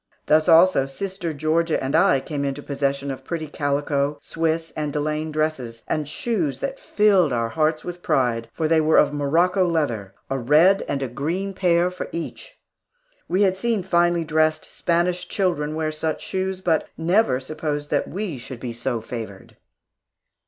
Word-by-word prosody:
Thus, 155 +3 +3
also, 165 -4 +6
Sister 180 +4 -4
Georgia 155 +2 +1
and 135 +1 -2
I 135 - +5
came 145 -1 -4
into 140 +1 -3
possession 140 0 -1
of 135 0 -7
pretty 165 +2 -4
calico, 145 0 -1
Swiss, 165 +2 -2
and 150 -1 -2
delaine 150 +1 -2
dresses, 145 -7 -2
and 155 -2 -1
shoes 170 - -2
that 275 0 -4
filled 195 -7 +3
our 115 -2 0
hearts 155 +6 0
with 175 0 -7
pride, 115 -6 0
for 160 +4 -1
they 160 0 +4
were 155 +1 +3
of - - +4
Morocco 170 +7 +2
leather, 145 - -1
a 135 - -2
red 155 +10 +4
and 140 -1 -2
a - - -1
green 165 +11 -3
pair 180 -1 +2
for 180 - -6
each. 170 - -7 0.7
We 190 +3 +2
had 190 -1 +2
seen 225 -2 0
finely 175 -2 +2
dressed 155 0 +1
Spanish 175 +1 0
children 155 -7 -1
wear 155 -1 -1
such 155 0 -3
shoes, 190 0 -3
but 165 -4 +1
never 170 - +2
supposed 145 +1 -4
that - - +1
we 185 -8 -4
should 125 0 -8
be 120 -1 -5
so 120 0 -2
favored. 110 -4 -8
155 Hz, 165 wpm, -23 LUFS, 140-175 Hz, 0.7 s, also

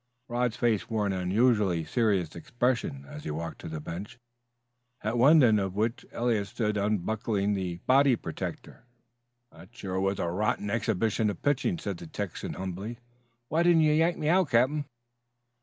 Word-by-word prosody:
Rod's 120 -2 -1
face 115 -4 +1
wore 110 -2 0
an 100 - 0
unusually 95 -2 +2
serious 100 -8 0
expression 115 - -1
as 75 - -9
he - - -5
walked 80 +2 -5
to - - -7
the 80 -1 -5
bench, 85 +9 -7 0.9
at 110 +3 -1
one 140 +5 +6
end 110 -3 +5
of 95 -1 -3
which 110 +3 -1
Eliot 115 -4 0
stood 105 +1 -1
unbuckling 105 0 0
the 90 -3 -3
body 135 0 +5
protector. 120 +1 -7 0.6
"That 85 +3 -16
sure 95 -2 -3
was 95 +1 0
a - - -1
right 95 +6 -1
rotten 105 - -1
exhibition 110 0 +1
of 100 - -6
pitching," 145 +6 +1
said 100 - -4
the 85 - -9
Texan 100 +2 -5
humbly. 95 +5 -5 0.5
"Why 160 +6 +1
didn't 170 -1 +5
you 155 -1 +4
yank 165 +3 +2
me 150 - -2
out, 180 -1 +3
captain?" 130 +6 +2
105 Hz, 170 wpm, -28 LUFS, 95-120 Hz, 0.9 s, one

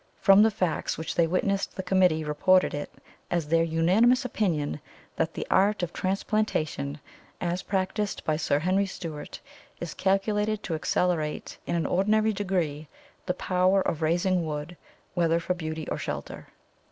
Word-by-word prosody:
From 195 0 +7
the 220 - +6
facts 180 -6 -1
which 160 - -4
they 170 -1 +3
witnessed 195 +3 0
the 190 - -4
committee 180 -4 +3
reported 185 +5 +3
it 145 0 -4 0.4
as 170 -3 -1
their 165 +1 +3
unanimous 190 +11 +3
opinion 165 - -1 0.3
that 165 0 -1
the - - -3
art 200 0 +3
of 175 - -3
transplantation, 185 -7 -1 0.4
as 175 +1 -1
practised 195 +1 -2
by 155 - +1
Sir 150 -2 +1
Henry 185 +5 +1
Steuart, 165 -5 -7 0.4
is 170 -2 -5
calculated 210 +2 0
to 170 - -3
accelerate 160 -1 -1
in - - 0
an 170 - +1
extraordinary 215 +3 +2
degree 175 -7 -2 0.4
the 180 - 0
power 185 +2 +2
of 160 - -2
raising 175 +3 +1
wood, 150 +2 -5 0.4
whether 170 -1 +2
for 175 +2 -1
beauty 160 -3 -5
or - - -3
shelter." - - -6
180 Hz, 155 wpm, -27 LUFS, 160-195 Hz, 0.4 s, From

